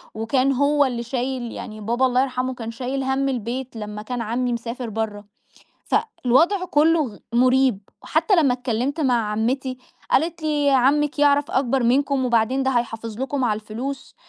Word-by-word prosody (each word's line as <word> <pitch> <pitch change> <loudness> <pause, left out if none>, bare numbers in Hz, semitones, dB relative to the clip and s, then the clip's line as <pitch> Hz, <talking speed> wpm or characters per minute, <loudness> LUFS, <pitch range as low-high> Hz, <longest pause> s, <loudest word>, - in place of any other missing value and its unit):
وكان 255 +5 +1
هو 285 +2 +3
اللي 240 -3 -2
شايل 250 0 -3
يعني 215 -2 -8
بابا 235 +5 +1
الله 255 0 +2
يرحمُه 255 -1 -1
كان 230 -2 -6
شايل 260 +3 -3
هَمّ 265 +1 0
البيت 250 +1 -4
لمّا 210 -1 -6
كان 245 +3 -4
عمي 240 +2 -1
مسافر 235 +1 -5
برّه، 215 -1 -4 0.6
فالوضع 360 - +1
كُلُّه 325 0 +3
غ 210 - -12 0.2
مُريب، 255 -3 +3 0.2
حتّى 420 - +2
لمّا 295 -7 +4
اتكلّمت 250 +4 -2
مع 240 -7 +1
عمتي، 255 +4 -1 0.3
قالت 330 +2 +1
لي: 295 -2 +1
"عمِّك 280 +3 +2
يعرف 290 0 +3
أكبر 265 0 +1
منكم 265 +2 +2
وبعدين 240 +3 +2
ده 265 - +1
هيحافظ 230 -2 -3
لكم 270 0 -1
على 215 -3 0
الفلوس، 245 +6 -6
255 Hz, 160 wpm, -22 LUFS, 235-275 Hz, 0.6 s, لمّا